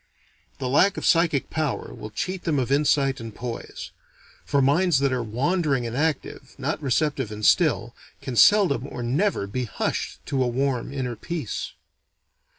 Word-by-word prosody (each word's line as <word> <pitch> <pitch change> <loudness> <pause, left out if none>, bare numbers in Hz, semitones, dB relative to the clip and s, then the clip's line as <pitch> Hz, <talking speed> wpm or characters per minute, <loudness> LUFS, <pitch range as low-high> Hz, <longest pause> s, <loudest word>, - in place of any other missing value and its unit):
This 130 - -3
lack 180 +10 +3
of - - -3
psychic 165 -4 +2
power 155 -4 -2
will 110 - -8
cheat 185 - -4
them 155 -3 0
of 130 -1 -1
insight 140 -1 +2
and 115 -2 -8
poise; 120 -2 -6 0.5
for 140 - +1
minds 150 +4 +3
that 135 -1 +1
are 125 - 0
wandering 135 - 0
and 115 0 -4
active, 150 -2 -2
not 140 +3 -2
receptive 140 -3 0
and 105 0 -4
still, 120 -8 +3 0.3
can 130 - -5
seldom 155 - +5
or 125 - -6
never 140 - 0
be 125 +6 -3
hushed 110 - -3
to 135 -2 -1
a - - 0
warm 130 0 -1
inner 130 -3 -3
peace. 160 -3 -5
135 Hz, 160 wpm, -24 LUFS, 120-155 Hz, 0.5 s, seldom